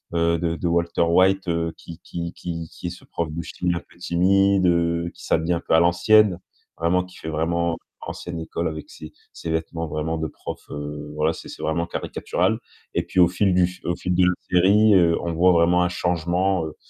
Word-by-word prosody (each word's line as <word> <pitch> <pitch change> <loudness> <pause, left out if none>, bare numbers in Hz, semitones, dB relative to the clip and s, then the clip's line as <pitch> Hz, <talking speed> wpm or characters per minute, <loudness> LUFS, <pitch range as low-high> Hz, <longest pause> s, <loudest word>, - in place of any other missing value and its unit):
heu, 85 0 +2
de 85 -1 -1
de 85 - -2
Walter 85 0 0
White, 95 +3 +3
heu, 85 -1 -1
qui 85 +1 -11
qui 85 0 -5
qui 85 -2 -6
qui 90 - -7
est - - -4
ce 90 - -12
prof 85 -2 -3
de 85 +2 -4
chimie 90 +1 -2
un - - -2
peu - - -21
timide, 95 +2 +3
heu, 85 0 +1
qui - - -14
s'habille 80 +2 +1
un 85 - -1
peu - - 0
à - - +6
l'ancienne, 95 +2 +4 0.4
vraiment 90 +2 +2
qui 90 0 -14
fait 80 - -6
vraiment 85 +1 0 0.3
ancienne 85 -1 -6
école 85 +1 -3
avec 80 -1 -6
ses 75 - -11 0.2
ses 85 - -7
vêtements 80 0 -2
vraiment 75 +2 -2
de 80 0 -2
profs, - - -9
heu, 75 0 -6
voilà, 80 +2 +1
c'est - - -10
c'est - - -9
vraiment 85 +2 -1
caricatural - - -1 0.4
et 85 - +2
puis 90 +1 -2
au 85 - +8
fil 95 +2 +1
du 90 0 +4
f 90 - -11
au 85 - 0
fil 90 - -2
de 90 - +4
la 90 - +3 0.2
série, 100 +4 +5
heu, 85 -2 +4
on 85 -1 -2
voit 90 +3 +4
vraiment 85 +1 +4
un 90 - +1
changement, 90 +1 0
heu 75 - -7
85 Hz, 220 wpm, -23 LUFS, 80-90 Hz, 0.4 s, au